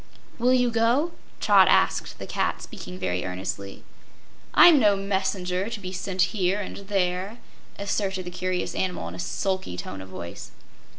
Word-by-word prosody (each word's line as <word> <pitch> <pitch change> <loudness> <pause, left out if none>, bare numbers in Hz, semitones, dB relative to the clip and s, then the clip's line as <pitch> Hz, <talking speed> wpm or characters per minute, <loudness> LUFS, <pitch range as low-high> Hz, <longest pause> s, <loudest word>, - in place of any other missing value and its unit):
"Will 245 +2 +3
you 250 -1 +3
go?" 235 +9 +2 0.3
Trot 200 -3 +6
asked - - +2
the - - -7
cat, - - -1
speaking 90 +1 -8
very 90 -1 -2
earnestly. 95 +2 -5 0.7
"I'm 340 -5 +9
no 210 -4 +5
messenger, 190 -1 -1
to 230 -2 -5
be 185 -2 -6
sent 185 0 0
here 195 -1 +1
and 205 - -5
there," 195 +1 -1 0.4
asserted 195 -2 -2
the 180 - -6
curious 185 0 -2
animal 180 - -2
in - - -9
a 90 - -8
sulky 185 - -2
tone 95 +1 -6
of 95 - -10
voice. 95 -2 -8
190 Hz, 160 wpm, -25 LUFS, 175-205 Hz, 0.7 s, I'm